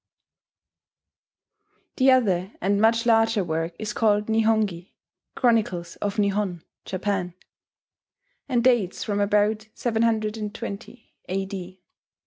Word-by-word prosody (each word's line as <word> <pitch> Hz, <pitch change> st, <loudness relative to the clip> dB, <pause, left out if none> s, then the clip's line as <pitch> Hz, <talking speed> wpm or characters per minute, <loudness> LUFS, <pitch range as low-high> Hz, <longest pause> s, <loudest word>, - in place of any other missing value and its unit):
D. 260 Hz, -, +1 dB
The 265 Hz, -, +7 dB
other 195 Hz, -7 st, +2 dB
and 200 Hz, +2 st, +1 dB
much 230 Hz, +1 st, +3 dB
larger 225 Hz, -2 st, +3 dB
work 165 Hz, 0 st, -3 dB
is 210 Hz, -1 st, -4 dB
called 210 Hz, -1 st, +1 dB
Nihongi, 220 Hz, -5 st, 0 dB, 0.4 s
"Chronicles 210 Hz, -9 st, +1 dB
of 205 Hz, +1 st, -3 dB
Nihon 200 Hz, -4 st, 0 dB, 0.2 s
[Japan]," 185 Hz, -2 st, -2 dB, 1.1 s
and 240 Hz, -3 st, +1 dB
dates 235 Hz, -8 st, +2 dB
from 205 Hz, -2 st, -2 dB
about 210 Hz, +1 st, +1 dB
720 220 Hz, 0 st, -2 dB, 0.2 s
A.D. 190 Hz, -1 st, -5 dB
210 Hz, 100 wpm, -24 LUFS, 190-225 Hz, 1.1 s, The